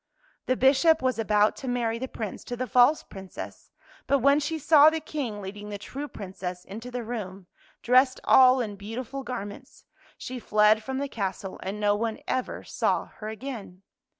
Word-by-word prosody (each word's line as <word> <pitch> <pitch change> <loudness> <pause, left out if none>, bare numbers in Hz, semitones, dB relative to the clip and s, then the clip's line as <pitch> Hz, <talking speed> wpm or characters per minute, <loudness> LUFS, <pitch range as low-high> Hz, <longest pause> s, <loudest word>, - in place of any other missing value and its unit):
The 255 - +1
Bishop 280 +4 +4
was 255 -3 0
about 210 -1 +3
to 265 - -7
marry 235 -2 -1
the 260 - -3
Prince 215 -5 -6
to 245 - -5
the 255 - -2
false 250 +6 +4
Princess, 190 -2 -10 0.4
but 280 - +4
when 280 +3 +4
she 320 +2 -2
saw 305 0 +7
the 320 0 -2
King 275 -9 -4
leading 205 +2 -7
the 205 - -5
true 275 +8 -6
Princess 185 -5 -7
into 225 +5 -8
the 245 -1 -4
room, 200 -5 -6 0.4
dressed 255 +2 +4
all 255 0 +6
in 210 -4 -4
beautiful 230 +6 -6
garments, 205 -6 -8 0.3
she 255 0 -6
fled 215 -1 +4
from 265 +3 -4
the 280 +1 -2
castle, 195 -5 -4
and 195 +3 -5
no 205 -1 +3
one 225 +1 -2
ever 255 - -2
saw - - -1
her 215 - -6
again. 220 -6 -8
235 Hz, 180 wpm, -27 LUFS, 205-265 Hz, 0.4 s, saw